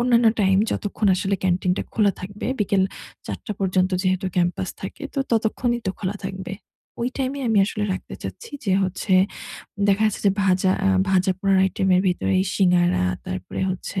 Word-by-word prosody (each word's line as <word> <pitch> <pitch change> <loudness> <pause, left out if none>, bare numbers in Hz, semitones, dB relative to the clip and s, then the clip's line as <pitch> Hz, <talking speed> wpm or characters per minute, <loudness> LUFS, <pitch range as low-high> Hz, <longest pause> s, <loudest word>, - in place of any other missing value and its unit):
অন্যান্য 240 -1 +4
টাইম 190 -1 +4 0.2
যতক্ষণ 205 0 -1
আসলে 195 +1 0
ক্যান্টিনটা 180 0 +1
খোলা 205 -3 +3
থাকবে, 200 +3 -6
বিকেল 200 -1 +2 0.4
৪ঃ০০ 215 - -5
পর্যন্ত 185 -1 +2
যেহেতু 185 0 0
ক্যাম্পাস 175 +1 0
থাকে, 195 +10 -7
তো 275 - -2
ততক্ষণই 235 +2 +1
তো - - +2
খোলা 200 +1 -3
থাকবে। 190 -1 -5 0.5
ওই 240 - +1
টাইমে 270 +1 -1
আমি 220 - +3
আসলে 210 -1 -2
রাখতে - - -8
চাচ্ছি 465 - -7 0.2
যে 190 - +2
হচ্ছে 185 +1 -1 0.7
দেখা 200 +2 +3
যাচ্ছে 215 - -2
যে 195 - +6
ভাজা 185 0 +3
আ - - +4 0.2
ভাজাপোড়ার 190 +1 +2
আইটেমের 190 -1 +2
ভিতরে 185 +1 0 0.2
সিঙ্গারা, 180 - +3 0.2
তারপরে 90 0 -5
হচ্ছে 190 +1 -4
190 Hz, 160 wpm, -23 LUFS, 185-210 Hz, 0.7 s, যে